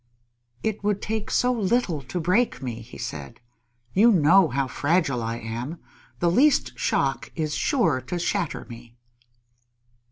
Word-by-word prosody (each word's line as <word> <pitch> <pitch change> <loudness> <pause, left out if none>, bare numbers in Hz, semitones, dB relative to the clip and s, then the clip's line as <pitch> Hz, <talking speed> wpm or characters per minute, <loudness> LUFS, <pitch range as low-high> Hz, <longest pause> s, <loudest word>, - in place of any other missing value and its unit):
"It 215 -2 -2
would 205 -1 +1
take 220 0 -3
so 250 0 +2
little 205 - 0
to 135 +7 -5
break 185 +9 +1
me," 120 -4 -5
he 115 +2 -12
said. 80 - -7 0.5
"You 230 +4 +6
know 180 0 +5
how 135 -1 -1
fragile 140 -2 0
I 115 +1 -3
am. 120 +8 -5 0.4
The 170 -1 +3
least 280 - +3
shock - - -1
is 155 -2 -2
sure 165 - +1
to 180 - -2
shatter 175 0 -2
me!" 120 0 -12
165 Hz, 140 wpm, -25 LUFS, 125-205 Hz, 0.5 s, You